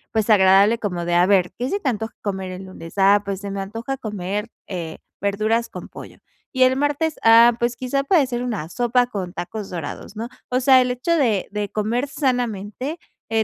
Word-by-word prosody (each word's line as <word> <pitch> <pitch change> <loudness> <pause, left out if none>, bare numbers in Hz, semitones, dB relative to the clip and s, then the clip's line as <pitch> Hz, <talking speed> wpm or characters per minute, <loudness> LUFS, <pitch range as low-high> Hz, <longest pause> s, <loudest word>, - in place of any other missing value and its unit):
pues, 220 0 +1
agradable 200 +2 +5
como 180 -6 -3
de, 175 0 -1
a 175 +1 +5
ver, 185 -2 +3
¿qué 250 - -1
se 400 +5 -2
te 275 - 0
antoja 220 -1 -4
comer 190 -2 -3
el 185 +1 -8
lunes?. 165 -3 -10
Ah, 200 +1 +5
pues 195 -1 -4
se 200 -1 -5
me 200 - -4
antoja 225 +7 -4
comer, 210 -2 -4 0.2
eh, 170 -4 -6 0.2
verduras 215 +4 0
con - - -9
pollo. - - -11 0.3
¿Y 260 -1 +4
el 255 +1 +4
martes?. 290 +2 0
Ah, 230 +1 +7
pues, 240 0 0
quizá 260 +3 -1
puede 320 -3 +4
ser 245 -2 -3
una 220 -11 -3
sopa 245 +4 +1
con 190 -6 -5
tacos 195 +4 -6
dorados, 180 +4 -7
¿no? 230 +3 -5 0.2
O 255 +1 +1
sea, 260 0 +6
el 250 0 0
hecho 250 +7 -2
de 225 - +1
de 210 0 -2
comer 225 +7 -1
sanamente, 250 - -2 0.3
eh, 225 0 +1
220 Hz, 205 wpm, -22 LUFS, 195-250 Hz, 0.3 s, Ah